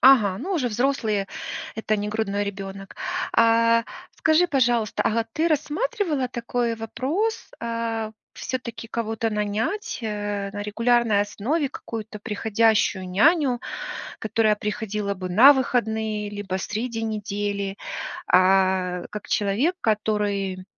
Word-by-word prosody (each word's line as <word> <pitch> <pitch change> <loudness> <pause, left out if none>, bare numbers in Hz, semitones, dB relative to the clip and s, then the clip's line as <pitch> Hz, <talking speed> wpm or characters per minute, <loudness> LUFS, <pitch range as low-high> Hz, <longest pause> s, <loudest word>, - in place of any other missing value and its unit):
Ага, 220 -8 +6
ну, 385 - -3
уже 270 -9 +1
взрослые, 225 -4 0 0.5
это 215 -1 0
не 205 0 -2
грудной 205 -1 -1
ребёнок. 195 -1 -7 0.4
А 230 0 +4 0.3
скажи, 315 +3 +4
пожалуйста, 240 - +1
ага, 230 +1 +1
ты 325 +6 +1
рассматривала 310 - 0
такой 235 -1 -1
вопрос, 270 - -2
а 230 -1 -2 0.2
всё-таки 245 -3 -5
кого-то 225 0 -2
нанять, 210 - -2
э, 205 -2 -3
на 205 0 -4
регулярной 230 0 +2
основе 265 +9 -1
какую-то 220 -4 -7
приходящую 210 -3 +1
няню, 265 - +3 0.6
которая 215 -1 +2
приходила 210 -1 -2
бы 185 -1 -5
на 255 +10 +9
выходные 220 -5 0
либо 205 -2 -3
среди 225 +3 -3
недели, 205 -2 -2 0.5
а, 185 -1 +3
как 210 0 -7
человек, 220 - +1
который, 205 -3 0
220 Hz, 115 wpm, -24 LUFS, 205-245 Hz, 0.6 s, на